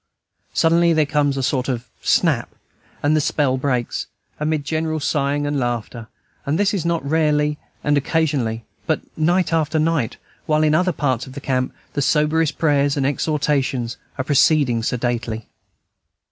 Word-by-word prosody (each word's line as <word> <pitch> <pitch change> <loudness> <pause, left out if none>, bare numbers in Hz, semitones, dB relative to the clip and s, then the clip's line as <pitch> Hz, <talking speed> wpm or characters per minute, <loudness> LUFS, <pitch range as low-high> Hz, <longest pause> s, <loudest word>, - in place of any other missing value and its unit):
Suddenly 170 +1 +4
there 155 -1 +3
comes 145 -1 +1
a 135 - -1
sort 130 0 0
of 125 -1 -2 0.2
snap, - - +2 0.5
and 145 +2 +3
the 155 - +3
spell 140 -2 +1
breaks, 130 -3 -1 0.3
amid 150 -1 -1
general 155 0 -1
sighing 145 0 0
and 145 -1 -1
laughter. 120 -2 -3 0.4
And 145 +3 0
this 200 -3 +1
not 170 -4 -1
rarely 150 -1 +1 0.2
and 145 - +2
occasionally, 140 -7 0 0.2
but - - +1
night 175 +3 +1
after 160 -1 +1
night, 155 -6 0 0.3
while 155 0 +3
in 155 -1 +3
other 180 +4 +3
parts 130 -6 -1
of 130 - -10
the 140 - -6
camp 130 -2 -1 0.2
the 145 - -1
soberest 150 +2 +2
prayers 145 -2 +2
and 135 - +1
exhortations 140 -4 0 0.2
are 130 - -1
proceeding 140 -3 +3
sedately. 115 -2 -2
145 Hz, 150 wpm, -21 LUFS, 130-155 Hz, 0.5 s, Suddenly